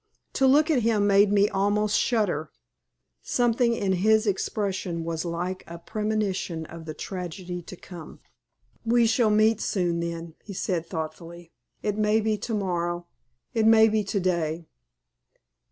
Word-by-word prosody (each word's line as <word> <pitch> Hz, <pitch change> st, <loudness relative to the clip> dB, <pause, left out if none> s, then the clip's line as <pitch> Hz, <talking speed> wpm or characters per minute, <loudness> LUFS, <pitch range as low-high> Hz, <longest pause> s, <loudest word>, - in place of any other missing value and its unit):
To 270 Hz, -, +3 dB
look 300 Hz, +4 st, +4 dB
at 265 Hz, -5 st, +3 dB
him 215 Hz, -2 st, +2 dB
made 200 Hz, 0 st, +5 dB
me 205 Hz, 0 st, +4 dB
almost 205 Hz, +1 st, +1 dB
shudder. 195 Hz, -, 0 dB, 0.7 s
Something 240 Hz, 0 st, +1 dB
in 195 Hz, -4 st, 0 dB
his 215 Hz, +4 st, +3 dB
expression 190 Hz, -4 st, -2 dB
was 165 Hz, 0 st, -3 dB
like 175 Hz, +2 st, -3 dB
a 170 Hz, -, -8 dB
premonition 200 Hz, -4 st, -2 dB
of 165 Hz, 0 st, -10 dB
the 155 Hz, -1 st, -6 dB
tragedy 180 Hz, 0 st, -6 dB
to 180 Hz, -, -10 dB
come. 175 Hz, -2 st, -11 dB, 0.6 s
"We 235 Hz, +1 st, +3 dB
shall 225 Hz, 0 st, +3 dB
meet 215 Hz, +1 st, +3 dB
soon, 175 Hz, -3 st, 0 dB
then," 170 Hz, -1 st, -5 dB
he 200 Hz, -, -9 dB
said, 175 Hz, -3 st, -2 dB
thoughtfully. 165 Hz, +1 st, -7 dB, 0.3 s
"It 210 Hz, 0 st, -1 dB
may 215 Hz, +1 st, +3 dB
be 215 Hz, 0 st, 0 dB
to 225 Hz, +1 st, -3 dB
morrow. 175 Hz, -3 st, -2 dB, 0.5 s
It 220 Hz, -1 st, +2 dB
may 220 Hz, 0 st, +7 dB
be 215 Hz, 0 st, +1 dB
to 200 Hz, +1 st, -1 dB
day. 170 Hz, -3 st, -1 dB
195 Hz, 150 wpm, -26 LUFS, 170-215 Hz, 0.7 s, may